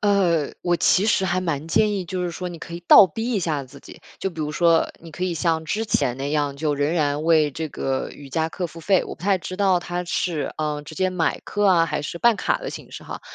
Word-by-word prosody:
呃， 180 -7 +2
我 175 -1 +2
其 190 +4 +3
实 195 -3 +2
还 185 0 0
蛮 160 -4 -3
建 210 +5 +3
议， 195 -3 -2
就 180 +1 -3
是 175 - -2
说 180 +2 -5
你 170 - -8
可 170 +1 -8
以 170 - -6
倒 195 - +10
逼 225 +7 -4
一 215 - +1
下 155 -6 -1
自 135 +2 -13
己。 - - -14 0.2
就 195 - -2
比 165 -3 -8
如 150 -1 -2
说 165 +1 +3
你 165 -1 -12
可 180 - -7
以 185 -1 0
像 160 0 0
之 215 +7 -2
前 125 - 0
那 135 +2 -3
样 145 -2 0
就 150 0 0
仍 145 +2 0
然 150 -3 0
为 160 -2 +4
这 160 +3 -4
个 135 -2 -2
瑜 145 -1 -12
伽 160 +4 -1
课 180 +2 -4
付 165 0 -12
费， 190 +2 +2
我 - - -7
不 - - -18
太 195 0 +2
知 185 +1 -7
道 190 -2 +3
它 175 0 -4
是， 170 -4 -2
呃， 150 -1 -2
直 155 +2 -10
接 185 - +1
买 175 -3 -1
课 205 -1 0
啊， 170 -3 +4
还 150 -1 -2
是 170 - -5
办 235 +5 +4
卡 - - 0
的 - - -6
形 - - -9
式 - - -9
哈。 - - -7
170 Hz, 290 characters per minute, -23 LUFS, 150-185 Hz, 0.2 s, 倒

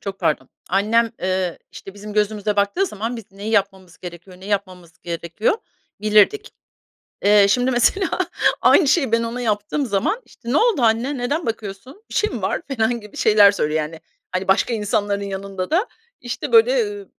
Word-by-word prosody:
çok 195 -1 -6
pardon, 135 -4 0 0.2
annem, 225 +4 +2
ııı, 185 -1 -1
işte, 195 - -11
bizim 210 +1 -9
gözümüze 210 0 0
baktığı 205 - +1
zaman 225 - -4
biz 220 -4 -12
neyi 200 +2 -6
yapmamız 195 -4 -1
gerekiyor, 180 +1 -11
ne 190 - -10
yapmamamız 185 -4 -3
gerekiyor, 170 - -1 0.5
bilirdik. 215 - +3 0.8
Eee, 205 0 +6
şimdi, 250 +4 +2
mesela, 325 +9 +2 0.5
aynı 315 - +5
şeyi 275 -5 +2
ben 230 0 +2
ona 235 +2 -4
yaptığım 215 +5 -1
zaman, 220 - -1
işte, 235 - -11
"Ne 280 - +3
oldu 450 - +2
anne, 235 +5 +1
neden 285 +7 -2
bakıyorsun, 225 - -6
bir - - -10
şey 425 - +2
mi - - -6
var?" - - -1
falan 235 -3 0
gibi 210 -1 -13
şeyler 210 -2 +6
söylüyor. 155 -5 -1
Yani, 160 +1 -6 0.3
hani, 185 +1 -2
başka 210 +5 +2
insanların 205 -2 -1
yanında 195 -1 -5
da, 370 +9 +2 0.3
işte, 245 -1 -5
böyle, 480 +2 +5
eee, 415 -2 -3
210 Hz, 170 wpm, -21 LUFS, 195-245 Hz, 0.8 s, Eee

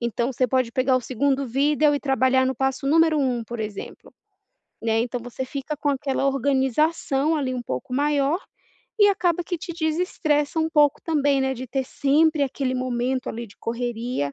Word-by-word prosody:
então 235 +2 -1
você 255 +1 +1
pode 255 -1 +1
pegar 255 +1 +2
o - - 0
2º 270 +2 0
vídeo 290 +4 +2
e 285 - -1
trabalhar 260 -1 +2
no 260 - -1
passo 270 +1 -1
número 320 +1 +4
1, 250 -4 0
por 235 +1 -6
exemplo, 210 -2 -7 0.7
né, 225 0 +1
então 245 +1 -2
você 245 +2 -6
fica 275 +3 -5
com 290 - -2
aquela 275 -1 -1
organização, 275 +2 +1
ali, 275 -4 -1
um 250 -1 -3
pouco 130 - -5
maior, 290 +3 +1 0.6
e 410 -1 +7
acaba 355 -4 +1
que 350 +1 -3
te 345 +2 -6
desestressa 315 -2 0
um 320 0 0
pouco 295 -3 +3
também, 285 -4 +1
né, 265 0 0
de 255 +1 -7
ter 265 +2 -2
sempre 295 +3 +2
aquele 265 -1 -2
momento, 255 +1 -1
ali, 235 +2 -5
de 205 - -18
correria, 235 - -3
270 Hz, 180 wpm, -23 LUFS, 250-295 Hz, 0.7 s, e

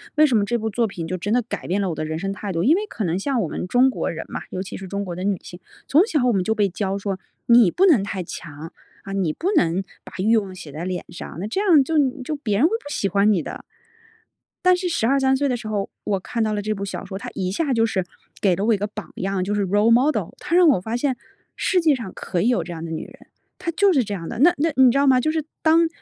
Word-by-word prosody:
为 310 - +6
什 265 -6 +2
么 210 - +3
这 240 +4 0
部 220 -1 -3
作 230 +1 +1
品 170 -4 -6
就 185 +1 -3
真 205 +4 -3
的 245 0 +2
改 240 - -6
变 190 +3 0
了 195 -2 0
我 - - -4
的 155 - -3
人 155 0 -3
生 195 +4 -3
态 200 0 -5
度。 165 -1 -1
因 295 - +5
为 415 +3 -2
可 220 - -4
能 175 +2 0
像 265 +4 -1
我 - - -2
们 180 - -4
中 250 +6 +4
国 - - -2
人 165 - -5
嘛， - - -5
尤 185 - -4
其 195 - -8
是 190 - -7
中 200 +1 -3
国 175 -2 -5
的 185 - -5
女 200 -1 +1
性， 175 - -10 0.3
从 300 - +5
小 295 - +1
我 245 - +4
们 190 -4 +1
就 220 +3 0
被 205 -2 +2
教 195 +1 -2
说 195 -1 -3 0.3
你 235 -5 +6
不 370 - +2
能 280 - +5
太 195 -2 -4
强， 160 -1 -9 0.3
啊， 195 - -7
你 185 -5 0
不 365 - -1
能 175 +3 +2 0.2
把 - - -13
欲 215 +5 +3
望 195 -4 -1
写 165 -6 -10
在 155 +4 -6
脸 180 0 -3
上。 170 - -8
那 190 - -3
这 225 - -2
样 340 -9 +5
就 320 - -4 0.3
就 300 +4 -3
别 220 -8 -1
人 265 - +4
会 370 - -5
不 450 -10 -3
喜 290 -9 -1
欢 200 +2 +3
你 175 -7 +1
的。 - - -7 1.0
但 365 0 +6
是 360 0 -2
12-13 265 -2 +2
岁 285 - +1
的 255 - 0
时 225 - -8
候， 205 -2 -2
我 200 -2 -1
看 230 +5 -4
到 215 - 0
了 210 - -1
这 215 +1 -1
部 200 -1 -5
小 200 - -6
说。 190 0 -6
它 - - -6
一 185 -2 -2
下 285 - -1
就 225 -1 +3
是 195 -5 -1 0.4
给 190 -3 +3
了 195 +4 -2
我 230 - +4
一 - - +1
个 205 +2 -2
榜 210 - -9
样。 190 0 -1
就 205 - -2
是 205 -1 +1
Role 205 +4 +3
model。 260 +6 +2
它 335 - -1
让 355 -1 +6
我 250 -11 +3
发 225 +4 -3
现 260 0 0 0.4
世 370 - +1
界 320 -4 +4
上 230 -7 -6
可 175 -2 -2
以 220 - +2
有 245 - +1
这 175 - -7
样 165 -1 -7
的 165 - -5
女 160 - -4
人， - - -16 0.3
她 365 - -4
就 395 +2 +3
是 265 - +3
这 205 -2 -4
样 165 -3 -6
的。 - - -6
那 345 +6 +5
那 320 +2 +1
你 260 -1 +7
知 275 - 0
道 280 - +3
吗？ 260 -2 +5
就 310 - +1
是 315 -2 -2 0.2
当 330 +1 +4
210 Hz, 330 characters per minute, -22 LUFS, 190-270 Hz, 1.0 s, 你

